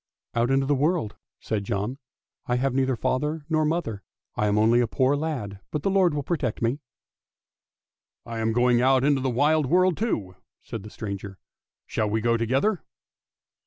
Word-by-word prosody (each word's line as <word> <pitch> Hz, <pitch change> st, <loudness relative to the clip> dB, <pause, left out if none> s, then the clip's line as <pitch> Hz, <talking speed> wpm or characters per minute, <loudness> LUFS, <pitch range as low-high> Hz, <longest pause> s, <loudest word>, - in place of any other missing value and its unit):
" -, -, -68 dB
" -, -, -64 dB
Out 120 Hz, +1 st, +1 dB
into 135 Hz, 0 st, +2 dB
the 145 Hz, -, +2 dB
wide 135 Hz, -, -1 dB
world," 155 Hz, -, 0 dB, 0.2 s
said 105 Hz, -2 st, -2 dB
John. 105 Hz, +7 st, -3 dB, 0.2 s
" -, -, -46 dB
I 125 Hz, -, +1 dB
have 130 Hz, +1 st, 0 dB
neither 130 Hz, -1 st, +1 dB
father 150 Hz, +6 st, -1 dB
nor 155 Hz, -1 st, +2 dB
mother, 150 Hz, -10 st, -2 dB, 0.3 s
I 105 Hz, -, +1 dB
am 105 Hz, 0 st, +2 dB
only 115 Hz, +3 st, +4 dB
a 120 Hz, -, +1 dB
poor 130 Hz, +4 st, +2 dB
lad, 135 Hz, -11 st, -3 dB
but 150 Hz, -, -3 dB
the 195 Hz, -, +1 dB
Lord 185 Hz, -5 st, +3 dB
will 145 Hz, -, -2 dB
protect 135 Hz, -8 st, -2 dB
me." 120 Hz, +5 st, 0 dB, 1.5 s
"lam 115 Hz, -1 st, -1 dB
going 120 Hz, +1 st, +3 dB
out 130 Hz, 0 st, +4 dB
into 140 Hz, -1 st, +3 dB
the 130 Hz, -, 0 dB
wide 145 Hz, +4 st, +2 dB
world 180 Hz, +3 st, +3 dB
too! 105 Hz, -, -2 dB
" -, -, -63 dB
said 115 Hz, -, -6 dB
the 105 Hz, -, -10 dB
stranger; 100 Hz, -2 st, -6 dB, 0.3 s
" -, -, -68 dB
shall 105 Hz, -1 st, -1 dB
we 110 Hz, +2 st, 0 dB
go 115 Hz, +1 st, +2 dB
together? 135 Hz, -, +1 dB
130 Hz, 200 wpm, -25 LUFS, 110-150 Hz, 1.5 s, only